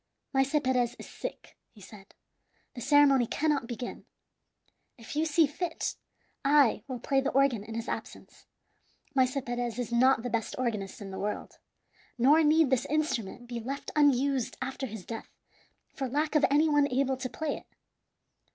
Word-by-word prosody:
"Maese 270 +2 +2
Perez 250 -2 +1
is - - -10
sick," - - -8
he 215 - -19
said; 200 0 -14 0.6
"the 245 - -8
ceremony 275 -3 +5
cannot 290 -4 0
begin. 245 0 -6 0.9
If 230 +4 -9
you 310 +2 +2
see 315 +1 +4
fit, 325 +4 -3 0.5
I 280 -3 +4
will 260 -2 -4
play 270 +3 +1
the 275 - 0
organ 270 -6 +2
in 225 +1 -8
his 230 +1 -4
absence. - - -7 0.7
Maese 260 0 +2
Perez 240 -1 -3
is 245 -2 -3
not 245 0 +4
the 245 - -2
best 225 -1 -2
organist 215 -6 -3
in 195 -1 -7
the 190 - -6
world, 210 +1 -4 0.6
nor 280 +7 +5
need 310 -2 +4
this 260 - +2
instrument 255 -7 -2
be 240 -1 -5
left 270 +5 -5
unused 275 -3 +2
after 265 +1 -4
his 215 -4 -8
death 225 -1 -7 0.6
for 270 - -3
lack 295 +4 0
of 300 -2 +4
any 295 +3 +4
one 290 -2 +3
able 265 +1 +1
to 255 0 -4
play 305 +3 -3
it." - - -14
260 Hz, 165 wpm, -29 LUFS, 235-290 Hz, 0.9 s, ceremony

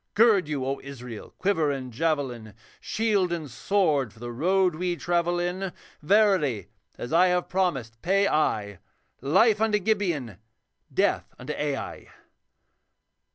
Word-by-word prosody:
Gird 210 -6 +5
you, 145 -4 -2
O 135 +1 -2
Israel, 125 -5 -9
quiver 185 -6 +1
and 130 -3 -4
javelin, 125 -7 -2 0.2
Shield 210 -5 0
and 165 -3 -3
sword 145 - +1
for - - -22
the 120 +1 -6
road 180 +8 +2
we 175 +2 -2
travel 175 0 0
in; 180 +2 -2 0.3
Verily, 160 - +2 0.3
as 120 - -6
I 180 +3 +6
have 180 0 +1
promised, 135 -12 -1
pay 195 +3 +2
I 105 - 0 0.4
Life 195 - +3
unto 220 -1 +3
Gibeon, 175 - -1 0.5
death - - 0
unto 135 +4 -5
Ai.' 145 -2 -4
165 Hz, 130 wpm, -26 LUFS, 130-190 Hz, 0.5 s, I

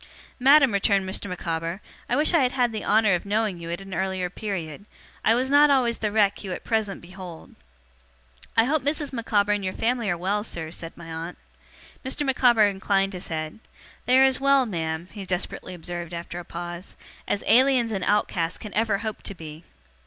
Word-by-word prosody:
'Madam,' 275 -1 +6
returned 200 -1 +2
Mr. 190 +1 -2
Micawber, 165 0 -3 0.3
'I 245 - +2
wish 300 +5 +4
I 335 - +5
had 255 -1 +1
had 245 -3 +2
the 215 -1 -4
honour 215 -2 +4
of 175 - 0
knowing 205 -2 -1
you 165 0 -7
at 170 +2 -4
an 195 -1 -9
earlier 185 0 -2
period. 190 -4 -5 0.4
I 225 - +4
was 260 +2 0
not 290 +1 +7
always 250 -4 +2
the 210 -1 -1
wreck 205 -1 +2
you 190 -2 -4
at - - -7
present 220 -4 -1
behold.' 180 -2 -10 1.0
'I 225 - +7
hope 295 +5 +1
Mrs. 290 +1 -2
Micawber 210 -4 +1
and 205 -1 0
your 185 0 -3
family 235 -2 0
are 175 - 0
well, 200 +4 -1
sir,' 165 -7 -5
said 165 -1 -8
my 165 -1 -9
aunt. 165 +2 -6 0.7
Mr. 270 +2 0
Micawber 245 -5 +4
inclined 195 0 0
his 180 - -6
head. 155 +3 -4 0.5
'They 255 +1 +5
are 265 - +7
as 265 -1 +3
well, 275 -1 +4
ma'am,' 165 -4 -3
he 205 -2 -7
desperately 185 0 -4
observed 175 0 -6
after 170 +1 -6
a 175 - -9
pause, 175 +1 -7 0.3
'as 200 - -1
Aliens 250 0 +4
and 195 -3 -2
Outcasts 180 -5 0
can 210 - -9
ever 220 -2 +1
hope 215 +1 -5
to 200 - -3
be. 160 -1 -10
200 Hz, 195 wpm, -25 LUFS, 175-235 Hz, 1.0 s, not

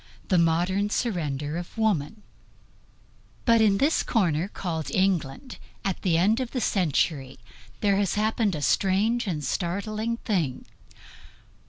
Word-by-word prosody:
THE 185 -4 +4
MODERN 175 +5 +1
SURRENDER 155 - -2
OF 175 +5 -8
WOMAN 210 -2 0 1.2
But 230 -2 +5
in 205 -3 +4
this 290 +8 +2
corner 175 - +1
called 165 -6 -4
England, 190 - -1 0.3
at 195 -2 -2
this 175 -4 +1
end 210 +7 +3
of 255 -2 -2
the 255 - -3
century, 150 - 0 0.4
there 200 -2 +3
has 200 -2 0
happened 215 -2 +1
a 150 - -4
strange 210 +7 +2
and 155 -5 -2
startling 210 - -2
thing. 170 - -2
195 Hz, 130 wpm, -26 LUFS, 165-215 Hz, 1.2 s, But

